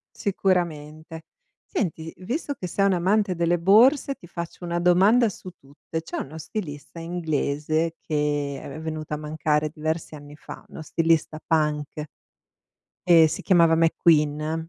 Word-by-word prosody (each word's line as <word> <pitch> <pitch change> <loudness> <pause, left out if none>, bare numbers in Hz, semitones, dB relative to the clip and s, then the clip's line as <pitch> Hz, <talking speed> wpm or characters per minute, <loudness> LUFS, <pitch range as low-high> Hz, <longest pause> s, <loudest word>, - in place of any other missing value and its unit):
Sicuramente. 160 -5 -2 0.5
Senti, 165 - -3
visto 275 - -3
che 180 - -6
sei 195 +3 0
un'amante 190 +1 +1
delle 170 +1 +2
borse, 255 - +5
ti 175 - -16
faccio 170 +1 -7
una 170 0 -2
domanda 195 +7 +4
su 185 -1 -9
tutte. 145 +3 -8
C'è - - -7
uno 150 +3 -6
stilista 155 -2 -7
inglese 160 -1 -1
che 145 -2 -2
è - - -9
ve 155 +3 -8
venuto 155 -1 -5
a - - -2
mancare 150 0 -1
diversi 155 0 -4
anni 145 0 -12
fa, - - -11
uno 160 - -9
stilista 160 0 0
punk. 150 -1 0 1.1
Ehm, 165 -2 +7
si 155 - -4
chiamava 170 -4 +4
McQueen. 160 -1 +2
160 Hz, 140 wpm, -24 LUFS, 150-180 Hz, 1.1 s, Ehm